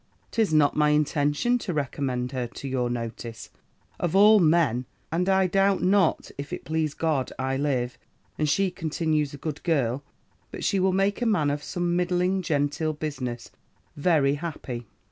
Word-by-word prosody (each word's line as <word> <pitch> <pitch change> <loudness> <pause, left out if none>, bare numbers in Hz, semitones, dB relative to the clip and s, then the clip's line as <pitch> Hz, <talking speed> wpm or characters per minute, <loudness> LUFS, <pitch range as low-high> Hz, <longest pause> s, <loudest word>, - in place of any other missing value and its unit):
'Tis 220 -6 +1
not 150 -2 +4
my 150 0 +3
intention 150 - +1
to 180 -7 -4
recommend 130 -3 -2
her 125 -3 -2
to 135 - -8
your 125 -2 -1
notice, 115 -1 -6 0.5
of 175 0 -1
all 210 +2 +7
men; 155 - +2 0.2
and 180 +3 0
I 190 0 +4
doubt 195 +1 +2
not, 190 -2 +2
if 140 0 -6
it - - -6
please 155 0 -1
God 155 -5 0
I 130 0 -1
live, 130 -3 -1 0.4
and 155 -1 0
she 195 +4 +2
continues 155 -4 -1
a - - -9
good 150 +1 -5
girl, 140 -6 0 0.5
but - - -7
she 200 - +1
will 190 0 +3
make 195 +4 +1
a 240 - +1
man 155 -10 +2
of 145 0 -3
some 175 +2 -2
middling, 180 +1 +1
genteel 155 -1 0
business, 130 -6 -5 0.4
very 145 -3 +3
happy.' 145 -7 -5
155 Hz, 165 wpm, -26 LUFS, 135-180 Hz, 0.5 s, all